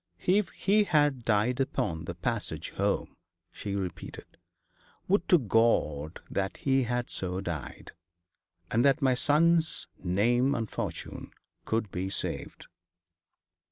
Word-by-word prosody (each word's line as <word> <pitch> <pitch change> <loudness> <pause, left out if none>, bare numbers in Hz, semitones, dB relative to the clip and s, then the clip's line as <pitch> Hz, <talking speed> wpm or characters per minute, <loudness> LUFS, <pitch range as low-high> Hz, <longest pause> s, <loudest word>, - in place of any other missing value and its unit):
'If 195 +2 +3
he 205 +2 +2
had 145 -7 +2
died 115 +3 +2
upon 105 -12 -1
the 85 - -5
passage 105 +5 -3
home!' - - -1 0.4
she 100 -1 -5
repeated. 95 -3 -5 0.8
'Would 200 +3 +1
to 180 - +8
God 100 - +1
that 95 0 -2
he 135 -2 +2
had 120 0 -1
so 90 0 -3
died, 85 -6 -6 0.8
and 115 +2 +3
that 140 +1 +3
my 130 -1 +4
son's 160 +5 +2 0.2
name 120 +9 +2
and 115 -4 -2
fortune - - -5 0.4
could 110 -3 -1
be 95 +1 -3
saved.' - - -3
120 Hz, 125 wpm, -29 LUFS, 95-140 Hz, 0.8 s, to